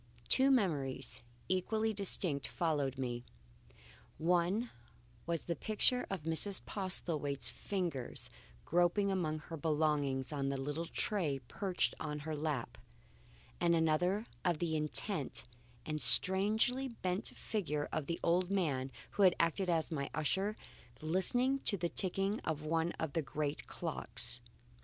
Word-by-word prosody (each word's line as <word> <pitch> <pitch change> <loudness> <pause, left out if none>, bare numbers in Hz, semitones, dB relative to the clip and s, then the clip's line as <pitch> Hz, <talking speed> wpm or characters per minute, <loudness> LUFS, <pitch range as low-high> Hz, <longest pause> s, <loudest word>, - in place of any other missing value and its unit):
Two 265 +1 +7
memories, 145 - 0 0.3
equally 215 +4 0
distinct, 180 -7 +4
followed 145 -6 -1
me. 120 -2 -3 0.9
One 180 +7 +1 0.6
was 170 -1 -2
a 170 - 0
picture 220 - +1
of 195 -6 -4
Mrs. 165 +5 0
Postlethwaite's 160 -7 0
fingers 175 -11 -2 0.3
groping 175 +4 +2
among 165 -5 0
her 165 +2 -8
belongings 150 -3 +1
on 135 -2 -1
the 140 - -1
little 145 +5 -3
tray 165 -10 0
perched 190 -3 0
upon 150 -1 -3
her 155 +1 -4
lap, 145 -7 -3 0.8
and 170 -1 +3
another 175 +6 +2 0.2
of 175 -3 +2
the 160 -1 -1
intent 150 +1 -2 0.4
and 155 -1 -1
strangely 220 +8 +4
bent 185 -6 -1
figure 150 -9 -2
of 150 -3 -2
the 170 - -2
old 180 +2 +2
man 145 -9 0 0.2
who - - -2
had 185 -3 +6
acted 175 +3 +1
as 165 -1 +1
my 140 -3 -2
usher, 195 +7 0 0.4
listening 245 - +2
to 205 - +2
the 170 -1 -1
ticking 195 +3 +1
of 155 -2 -3
one 165 +2 +1
of 160 -3 -4
the 165 - +1
great 145 +1 -3
clocks. - - -3
170 Hz, 135 wpm, -35 LUFS, 150-195 Hz, 0.9 s, Two